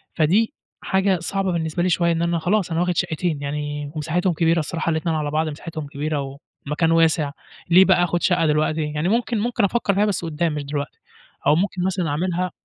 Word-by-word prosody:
فدي 195 - +2 0.3
حاجة 190 -1 +1
صعبة 195 +3 -1
بالنسبة 165 0 -1
لي 185 - +2
شوية، 170 0 +2
إن 165 0 0
أنا 170 0 +1
خلاص 180 +2 0
أنا 165 - 0
واخد 180 -1 0
شَقَّتين، 160 -2 -1
يعني 145 0 -4
مساحتهم 170 +4 0
كبيرة 165 +1 +2
الصراحة 165 +1 -2
الاتنين 160 +1 -1
على 150 -1 -2
بعض، 155 +1 0
مساحتهم 155 0 -7
كبيرة 140 -1 -3 0.3
والمكان 155 +3 +1
واسع، 165 -3 +3 0.4
ليه 185 +2 +7
بقى 180 -2 +4
آخد 175 0 0
شَقّة 175 -3 +3
دلوقتي، 155 +1 +1
يعني 150 +4 -1
ممكن، 230 +1 0
ممكن 235 +1 0
أفكر 200 0 +1
فيها 205 +2 +3
بس 200 -4 -1
قُدَّام 165 0 -1
مش 150 -1 -3
دلوقتي، 145 0 -5 0.5
أو 145 - +6
ممكن 180 +1 -1
مثلًا 185 -3 -1
أعملها 180 +4 -1
165 Hz, 195 wpm, -22 LUFS, 150-180 Hz, 0.5 s, ليه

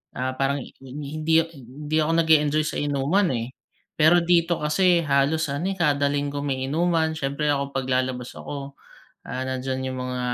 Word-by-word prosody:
ah, 130 +1 -1
parang 135 0 0
hi - - -13
hindi, 155 +4 0
hindi 145 +2 -7
ako 155 - +1
nag-e-enjoy 155 -1 +3
sa - - -3
inuman 145 +7 +1
eh. 115 +2 -4 0.5
Pero 160 +3 +6
dito 170 -1 +2
kasi 170 +2 +3
halos 145 +3 +2
ano 170 +8 -1
eh, - - -11
kada 145 -3 +2
linggo 145 0 -2
may 130 -2 -1
inuman, 165 +1 +1
siyempre 140 +1 -1
ako 140 -1 -1
'pag 130 -1 -1
lalabas 125 -1 -1
ako, 140 -1 -7 0.5
ah, 130 +1 -3
nandiyan 130 0 -3
yung - - -5
mga, 125 0 -3
145 Hz, 170 wpm, -24 LUFS, 135-160 Hz, 0.5 s, Pero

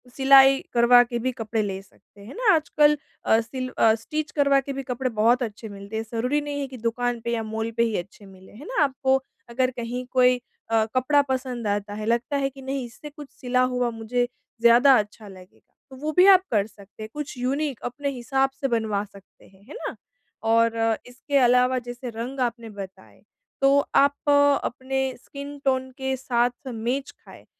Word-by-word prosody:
सिलाई 270 0 +6
करवा 240 +1 +6
के 240 0 -4
भी 255 +2 -1
कपड़े 225 0 -2
ले 195 -2 -3
सकते 200 +1 -22
हैं 225 - -10
ना, 460 -3 +4
आजकल 300 -1 +3 0.3
अ, 220 - +4
सिल 255 +2 -6
स्टिच 230 +8 +1
करवा 280 -2 +3
के 275 +1 -6
भी 275 0 -5
कपड़े 255 0 -2
बहुत 235 +3 +2
अच्छे 220 -1 -7
मिलते 200 +1 -9
हैं, 220 - -2
ज़रूरी 250 +6 0
नहीं 290 -1 -4
है 275 - -3
कि 260 -1 -10
दुकान 235 +1 -2
पे 235 +1 -3
या 225 -1 -1
माल 220 +1 -4
पे 235 - +4
ही 225 -3 0
अच्छे 200 +3 -8
मिलें। 190 -1 -16
है 265 - -11
ना? - - -1
आपको 265 -1 +1 0.3
अगर 255 +2 0
कहीं 245 0 -5
कोई 250 -1 +3 0.3
अ, 225 -1 +3
कपड़ा 285 +3 +3
पसंद 250 -3 -4
आता 205 0 -2
है, 215 +1 -5
लगता 235 +6 0
है 275 -1 0
कि 270 0 -14
नहीं 265 -1 -3
इससे 240 +6 -11
कुछ 295 -1 -11
सिला 250 0 -1
हुआ, 250 -1 +1
मुझे 230 +2 -1 0.3
ज़्यादा 240 +4 +7
अच्छा 210 +1 -6
लगेगा, 185 -2 -16 0.2
तो 265 - -12
वो 300 +3 -3
भी 365 - +7
आप 375 -2 +7
कर 205 -3 +2
सकते 205 0 -14
हैं, 215 - -8
कुछ 295 -3 -6
यूनिक 270 0 -2
अपने 280 +4 -3
हिसाब 270 +1 0
से 275 - +1
बनवा 220 -4 -1
सकते 200 -1 -19
हैं। 195 0 -23
है - - -9
ना? - - -5 0.5
और 230 0 +3 0.3
इसके 250 +4 -2
अलावा 250 0 +4
जैसे 245 +1 -6
रंग 250 +4 -5
आपने 235 -1 -9
बताए, 190 - -11 0.4
तो 275 +1 +5 0.2
आप 285 +1 +3 0.3
अपने 265 +2 -2 0.2
स्किन 285 +1 -8
टोन 260 -1 +1
के 265 0 -2
साथ 245 0 -1
मेच 245 +5 -3
खाएँ, - - -15
245 Hz, 195 wpm, -24 LUFS, 225-270 Hz, 0.5 s, ज़्यादा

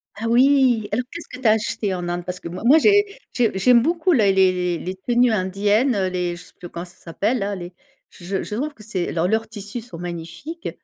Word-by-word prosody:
Ah 225 +2 -4
oui! 250 -3 +4
Alors 245 +4 -1
qu'est-ce 335 0 -8
que 255 - -10
tu 245 - +2
as 215 - +7
acheté 210 -2 -1
en 175 -1 -4
Inde? 175 0 -3
Parce 180 0 -6
que - - -8
moi 175 +2 -7
moi, 285 +6 +7
j'ai 410 +4 +3 0.2
j'ai 230 -5 +1
j'aime 240 +4 +5
beaucoup 335 +5 +1
les 215 - +4
les 185 -2 +2
les 185 +3 -5
tenues 240 +5 +2
indiennes, 205 +5 +1
heu, 190 -2 +1
les 180 -1 -2
je 175 - -12
sais - - -20
plus 175 - -9
comment 170 +1 -6
ça 180 +1 -18
s'appelle, 205 +9 -2
là, 200 0 -2
les 175 -1 -8 0.4
j - - -16
j 195 +1 -2
je 210 - -5
trouve 290 +5 -3
que 215 - -14
c'est 190 -5 -3
leurs 170 +1 0
leurs 220 +3 0
tissus 210 +2 -7
sont 220 -7 -11
magnifiques 175 - -6
205 Hz, 245 wpm, -22 LUFS, 180-245 Hz, 0.4 s, as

